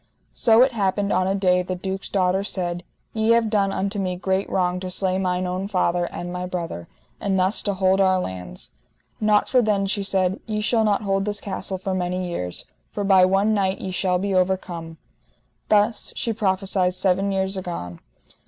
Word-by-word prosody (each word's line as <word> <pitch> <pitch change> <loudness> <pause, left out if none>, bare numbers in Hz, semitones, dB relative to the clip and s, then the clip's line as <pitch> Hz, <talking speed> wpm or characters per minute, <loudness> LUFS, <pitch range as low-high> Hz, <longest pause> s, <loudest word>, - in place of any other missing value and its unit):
So 225 +1 +5
it 265 - +2
happened 200 -2 0
on 185 - +2
a 195 - +1
day 180 -2 +3
the 185 0 -4
duke's 190 +1 -5
daughter 190 0 +1
said: 175 -3 -3 0.3
Ye 220 +1 +3
have 230 -2 +2
done 200 -2 +2
unto 200 +2 -2
me 185 -2 -1
great 190 +2 -1
wrong 180 -1 0
to 185 0 -5
slay 185 0 0
mine 180 -1 0
own 185 +2 -3
father, 175 -3 +1
and 175 +1 -6
my 180 0 -4
brother, 170 - -5 0.3
and 195 -1 0
thus 190 +4 +2
to 200 -2 -1
hold 190 +1 +3
our 190 -1 +4
lands: 90 - -5 0.5
not 210 -1 +3
for 255 - +4
then, 205 -3 +1
she 200 +1 0
said, 190 -1 +1
ye 215 -1 -2
shall 220 +1 +2
not 210 -1 +1
hold 195 -1 0
this 210 -1 -1
castle 190 -1 -3
for 190 +1 -3
many 180 0 -2
years, 90 - -5 0.3
for 205 - -3
by 190 -2 +6
one 195 +3 +2
knight 195 -2 0
ye 190 - -4
shall 180 0 +1
be 195 +2 -2
overcome. 180 -3 -1 0.7
Thus 210 +1 +2
she 230 -3 -1
prophesied 190 -3 0
seven 190 +1 +1
years 190 0 -1
agone. 170 - -5
190 Hz, 190 wpm, -23 LUFS, 180-200 Hz, 0.7 s, by